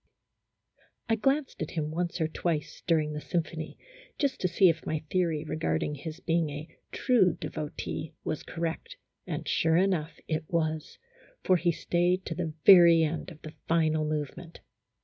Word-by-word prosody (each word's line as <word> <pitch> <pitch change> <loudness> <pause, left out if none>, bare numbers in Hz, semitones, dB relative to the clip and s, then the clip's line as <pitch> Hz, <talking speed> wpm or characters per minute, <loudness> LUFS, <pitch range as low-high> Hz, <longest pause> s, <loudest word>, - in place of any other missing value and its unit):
I 225 - +4
glanced 270 +6 0
at - - -2
him 155 -3 -3
once 175 +2 -2
or 160 - +1
twice 160 -1 -3
during 155 -3 +2
the 150 - -4
sym 170 +1 0
phony, 160 -1 -8 0.4
just 275 -3 -1
to 185 - +2
see 185 +2 +4
if 165 -1 +1
my 155 -1 -3
theory 170 -5 +1
regarding 155 -1 -1
his 155 +3 -7
being 165 -3 0
a 150 +3 -8 0.2
true 225 - +3
devotee 155 0 -5
was 155 - -3
correct, 170 - -5 0.3
and - - -4
sure 160 0 +2
enough 180 -4 0
it 155 0 -1
was, 160 -2 -2 0.5
for 185 - +4
he 175 0 +2
stayed 175 +3 0
to 165 - -3
the 165 -2 -3
very 170 -3 +8
end 160 +3 -2
of 160 -3 -14
the 155 - -8
final 155 -1 +2
movement. 155 +3 -4
165 Hz, 165 wpm, -29 LUFS, 155-180 Hz, 0.5 s, very